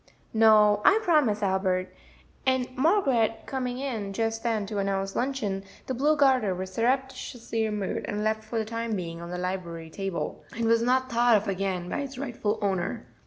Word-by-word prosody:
"No, 215 -2 +6
I 405 +2 +6
promise, 275 - +3
Albert;" 190 -1 0 0.5
and 260 -1 0
Margaret 260 - +2
coming 250 -2 -3
in 225 -7 -3
just 225 +1 -1
then 225 -3 0
to 205 0 -3
announce 195 0 -1
luncheon, 230 -7 -1 0.2
the 260 - -3
blue 295 +5 +2
garter 260 -9 +3
was 185 +1 -6
surreptitiously 245 -1 -1
removed 210 -3 -2
and 210 0 -2
left 220 0 0
for 220 +2 -4
the 220 - 0
time 230 0 -3
being 170 -3 -5
on 170 - -7
the 180 - -4
library 175 -3 -4
table, 195 -1 -4
and 230 - 0
was 230 0 +4
not 255 +2 +1
thought 235 -1 +5
of 210 +1 -3
again 190 -2 -2
by - - -2
its 275 -1 -5
rightful 230 -5 -2
owner. 190 -3 -1
220 Hz, 175 wpm, -27 LUFS, 195-255 Hz, 0.5 s, No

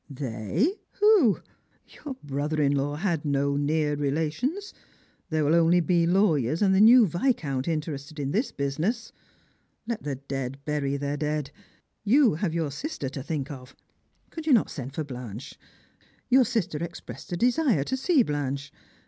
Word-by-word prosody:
''They! 140 - -1
Who? 410 - +4 0.5
Your 285 -3 -8
brother 145 +2 -2
in 140 -2 +3
law 145 +1 -1
had 170 -2 -1
no 140 -1 0
near 150 +1 +1
relation 155 - -1
i. - - -5 0.7
There 155 -2 +1
will 150 - +3
only 170 +1 +5
be 170 -1 +2
lawyers 170 - +2
and 190 -1 +4
the 190 - +4
new 235 +2 +8
Viscount 170 - -1
interested 155 -1 -4
in 140 -1 -2
this 225 - 0
business. 160 - -2 0.7
Let 230 -1 -3
the 140 -2 -3
dead 135 -1 -5
bury 140 -2 -1
their 145 +1 -2
dead. 150 -1 -2 0.5
You 245 - +4
have 165 +2 -1
your 160 -4 -1
sister 145 - -4
to 135 0 -6
think 145 -1 -4
of. 130 -1 -10 0.6
Could 320 -1 -7
you 295 - +5
not 230 - +3
send 135 -1 -7
for 155 - -2
Blanche? 125 -4 -8 0.8
Your 260 0 +6
sister 215 -10 -1
expressed 170 +2 -8
a 175 - -1
desire 245 - +2
to 260 - -2
see 270 +1 +3
Blanche. 140 -3 -3
155 Hz, 160 wpm, -26 LUFS, 140-210 Hz, 0.8 s, new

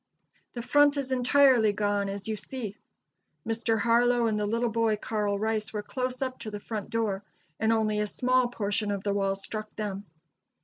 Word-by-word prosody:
The 240 - -5
front 290 +2 +4
is 270 -2 -2
entirely 250 -3 +4
gone, 205 -1 0
as 200 +1 -5
you 220 - -1
see. 215 -1 -6 0.7
Mr. 225 0 +1
Harlow 235 +2 +3
and 215 -2 +1
the 210 - 0
little 230 +2 0
boy 225 -1 +2
Carl 210 -1 -1
Rice, 215 +1 -1
were 210 -1 -3
close 255 +3 -3
up 255 -1 -4
to 215 - -5
the 205 -1 -6
front 210 -1 -5
door, 220 -4 -1 0.4
and 220 +1 +2
only 215 -2 +1
a 210 - 0
small 255 +3 +2
portion 210 -2 -2
of 200 -1 -2
the 200 - 0
wall 195 -1 +1
struck 215 +2 -6
them. 205 -2 -4
220 Hz, 185 wpm, -28 LUFS, 205-240 Hz, 0.7 s, front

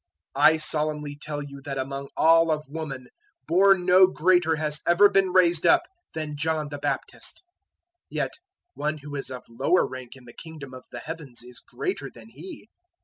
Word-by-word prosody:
011:011 145 +2 +7
"I - - -1
solemnly 150 -1 -2
tell 145 -1 -5
you 140 -1 -10
that 140 -2 -5
among 135 +1 -4
all 165 +1 +5
of 155 -2 -1
woman 140 -4 -6 0.4
born 190 +1 +4
no 185 +1 +7
greater 175 -2 +2
has 150 -1 -2
ever 175 +4 +7
been 195 -2 +2
raised 175 -3 +3
up 345 -1 +5 0.3
than 155 -2 -4
John 155 0 -1
the 145 -1 -6
Baptist; - - -4 0.7
yet - - -2 0.4
one 150 +1 -2
who 145 0 -9
is 135 - -5
of 125 -1 -7
lower 130 +10 +2
rank 130 -1 -8
in 130 -2 -16
the 120 - -13
Kingdom 155 -5 -10
of 130 0 -11
the 120 - -7
Heavens 150 -7 -8
is 125 0 -13
greater 135 +3 -4
than 115 -1 -15
he. 160 - -11
150 Hz, 180 wpm, -25 LUFS, 135-165 Hz, 0.7 s, 011:011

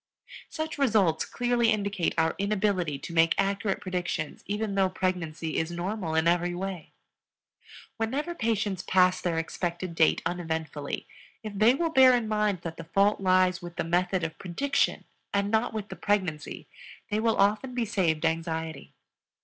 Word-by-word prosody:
Such 315 -2 -4
results 205 - +3
clearly 240 -1 +1
indicate 200 -4 0
our 160 0 +2
inability 200 -6 0
to 170 - -8
make 165 0 +4
accurate 195 0 0
predictions 180 -5 -3
even 205 0 -2
though 195 -1 +2
pregnancy 170 -4 -2
is 160 - 0
normal 175 -1 -3
in 160 +1 +2
every 175 +1 +2
way. 185 -2 -5 1.0
Whenever 270 +9 -2
patients 215 - -1
pass 185 -1 +3
their 170 -2 -1
expected 175 +2 -3
date 160 -1 +3
uneventfully, 160 -4 -3 0.4
if 215 -1 -6
they 215 +5 +4
will 330 +2 0
bear 260 -3 +7
in 235 -3 -1
mind 210 -4 0
that 165 -1 -6
the 165 - -8
fault 195 +5 +2
lies 185 -1 +3
with 175 0 -9
the - - -1
method 180 +2 0
of 160 -1 -4
prediction 195 +11 0 0.3
and 200 0 +1
not 220 +2 +2
with 215 -2 -5
the - - -6
pregnancy, 185 -8 -2 0.4
they 210 - +1
will 225 0 +1
often 210 +6 +2
be 240 -2 0
saved 170 -7 0
anxiety. 160 -2 -3
185 Hz, 155 wpm, -28 LUFS, 165-215 Hz, 1.0 s, bear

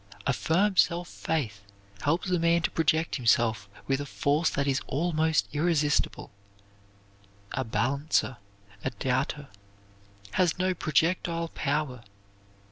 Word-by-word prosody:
A 140 - +2
firm 185 +9 +1
self 175 +1 +3
faith 120 -15 -3 0.4
helps 170 +5 0
a 180 - +2
man 170 0 +3
to - - 0
project 160 +1 +1
himself 115 -4 +2 0.2
with 135 +1 0
a - - -4
force 145 +4 +1
that 140 - -1
is 135 -1 +1
almost 160 +1 +1
irresistible. 150 -2 +1 1.2
A 130 - -1
balancer, 130 +3 0 0.5
a - - 0
doubter, 130 +3 -2 0.8
has 175 - +2
no 185 0 +1
projectile 165 +1 0
power. 145 -5 -2
150 Hz, 120 wpm, -28 LUFS, 135-170 Hz, 1.2 s, self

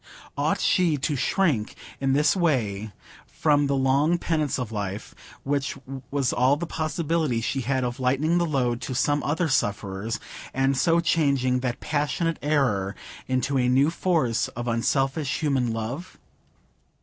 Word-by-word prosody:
Ought - - 0
she 170 -5 +2
to 145 +2 -1
shrink 135 - 0 0.2
in 135 -1 +1
this 150 +4 +3
way 110 - 0 0.4
from 145 -2 +2
the 140 - +1
long 135 +5 +2
penance 155 -5 -1
of 125 -3 -4
life, 100 -1 -4 0.3
which 140 0 -1 0.3
was 140 -3 0
all 130 +4 +3
the 170 - -3
possibility 155 -5 -1
she 130 +4 -2
had 130 +1 0
of 120 0 -3
lightening 140 +7 +2
the 170 - +2
load 125 -5 0
to 130 0 -4
some 145 +3 +1
other 160 +4 0
sufferers, 105 -5 -1 0.4
and 135 +1 +2
so 165 +5 +3
changing 140 -6 +2
that 125 -2 -3
passionate 150 +2 -1
error 120 -10 +1 0.3
into 130 +1 0
a 125 0 +2
new 135 +5 +4
force 160 -10 +1
of 120 0 -6
unselfish 135 +5 0
human 135 -6 +1
love? 120 +11 -5
135 Hz, 150 wpm, -25 LUFS, 120-155 Hz, 0.4 s, new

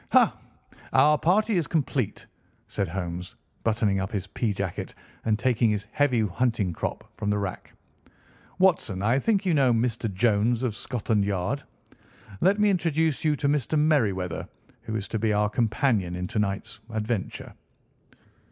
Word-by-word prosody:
"Ha! - - +5 0.6
Our 150 +1 +6
party 210 +4 +2
is 165 - 0
complete," 140 - -1 0.4
said - - -2
Holmes, 90 0 -5 0.3
buttoning 105 -3 +1
up 95 0 -3
his 100 -3 -2
pea 110 +3 -2
jacket 100 -3 -4 0.3
and 110 -1 +2
taking 120 -1 +2
his 105 -1 -1
heavy 135 -5 +2
hunting 110 -2 0
crop - - -4
from 105 0 -2
the 105 - +2
rack. 100 -2 -4 0.9
"Watson, 165 - +2
I 120 +5 +3
think 205 +3 +1
you 180 - +2
know 135 -4 +4
Mr. 115 -1 0
Jones, 110 +4 +2
of 120 -4 0
Scotland 110 -3 -1
Yard? 100 +7 -1 0.8
Let 200 +3 +3
me 210 -1 +4
introduce 160 -4 +1
you 155 -1 +3
to 140 - -1
Mr. 145 +1 +1
Merryweather, 105 - +1 0.3
who 110 - -5
is 105 -2 -3
to 110 - -2
be 110 0 +1
our 105 0 +2
companion 110 -5 +1
in 90 0 -3
to 110 -1 -1
night's 100 +1 -2
adventure." 110 -2 -3
115 Hz, 155 wpm, -26 LUFS, 100-140 Hz, 0.9 s, Our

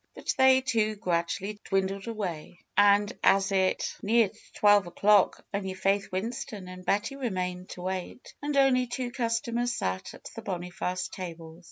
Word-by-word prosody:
But - - -2
they, 265 0 +6
too, 220 -4 +1
gradually 195 +2 -2
dwindled 195 +1 -1
away. 180 -7 -5 0.2
And 205 0 +4
as 195 0 +4
it 190 -1 +2
FAITH - - -5
^12 - - -29
neared 220 -1 +3 0.2
twelve 205 -2 +5
o'clock 200 +3 +3
only 190 -2 -2
Faith 195 +1 0
Winston 200 0 -4
and 185 0 -9
Betty 210 +8 0
remained 185 -8 -3
to 180 - -7
wait, 185 +5 -5
and 290 0 -1
only 255 -2 +4
two 245 0 -3
customers 240 0 -1
sat 95 0 -3
at - - -17
the 225 - -6
Boniface 180 -2 -3
tables. 165 -3 -8
200 Hz, 160 wpm, -28 LUFS, 185-230 Hz, 0.2 s, they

